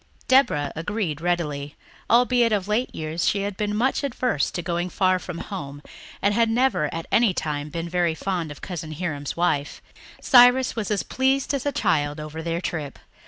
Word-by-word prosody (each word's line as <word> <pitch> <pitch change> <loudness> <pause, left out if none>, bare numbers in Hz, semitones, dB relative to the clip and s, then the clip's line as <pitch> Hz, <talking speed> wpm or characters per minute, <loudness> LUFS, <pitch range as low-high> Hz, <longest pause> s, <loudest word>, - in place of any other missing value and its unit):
Deborah 150 - +3
agreed 165 -2 -3
readily, 150 -5 -2 0.3
albeit 240 0 +4
of 200 -2 0
late 220 +4 0
years 160 +2 -2
she 200 -1 +1
had 200 -1 -3
been 210 +1 -2
much 260 +6 +1
averse 250 - 0
to 175 - -5
going 175 +2 -2
far 185 0 +2
from 180 -2 -7
home 145 -8 -6 0.4
and 200 +1 +3
had 230 +1 +3
never 240 - +1
at 165 -1 -5
any 225 -6 +3
time 150 -1 -3
been 165 +2 -4
very 170 -1 0
fond 175 -3 -2
of 145 - -10
Cousin 165 -4 -6
Hiram's 150 -4 -4
wife. 145 -5 0 0.4
Cyrus 250 0 +6
was 220 -4 -3
as 210 -2 0
pleased 265 +1 0
as 280 0 -2
a - - +2
child 150 - 0
over 155 +1 -6
their 170 +1 -2
trip. 150 -6 -4
180 Hz, 180 wpm, -24 LUFS, 155-225 Hz, 0.4 s, Cyrus